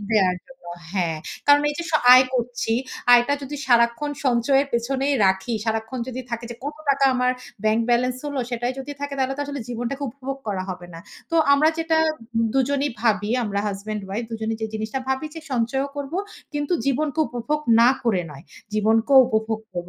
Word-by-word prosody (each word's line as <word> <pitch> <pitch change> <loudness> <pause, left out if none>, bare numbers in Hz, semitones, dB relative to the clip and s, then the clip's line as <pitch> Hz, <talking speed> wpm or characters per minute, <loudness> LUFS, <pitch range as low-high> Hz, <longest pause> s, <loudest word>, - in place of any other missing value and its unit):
দেয়ার 190 -4 +3
জন্য। 265 -8 -18 0.3
হ্যাঁ। 175 -5 0 0.3
কারণ 290 0 +6
এই - - -5
যে - - -1
স - - -11 0.2
আয় 255 - +8
করছি, 245 -2 -1 0.4
আয়টা 240 +4 +4
যদি 290 +2 -5
সারাক্ষন 235 +3 +3 0.2
সঞ্চয়ের 265 +3 +3
পেছনেই 270 +4 0
রাখি, 190 +5 0
সারাক্ষন 225 +3 -2
যদি 255 0 -4
থাকে 235 0 -4
যে, - - -5
কত 295 +1 -4
টাকা 275 0 +2
আমার 250 0 +2 0.3
ব্যাংক 215 +1 +3
ব্যালেন্স 250 +1 +2
হলো, 285 -2 -2
সেটাই 240 +1 -1
যদি 285 +2 -6
থাকে 285 0 -4
তাহলে 265 0 0
তো - - -4
আসলে 285 -2 -5
জীবনটাকে 245 +4 -3
উপভোগ 270 +1 -6
করা 195 -2 -2
হবে 180 -1 -7
না। - - -8 0.3
তো 330 - +1 0.2
আমরা 290 +2 +5
যেটা 325 0 +1 0.6
দুজনই 280 +2 +1
ভাবি, 215 -2 +1
আমরা 200 -2 -1
হাসব্যান্ড 205 +1 -5
ওয়াইফ 210 +5 -3
দুজনেই 220 0 -3
যে - - 0
জিনিসটা 220 +4 -3
ভাবি 265 +3 -1
যে 325 - -7
সঞ্চয়ও 260 +3 0
করবো। 285 +5 -3 0.4
কিন্তু 290 +2 -1
জীবনকে 295 +3 0
উপভোগ 245 +6 -2 0.2
না 235 - +7 0.2
করে 205 -7 +2
নয়। 140 -2 -12 0.3
জীবনকেও 225 +5 +4
উপভোগ 220 0 -1
করব। 175 0 -4
245 Hz, 180 wpm, -23 LUFS, 220-275 Hz, 0.6 s, আয়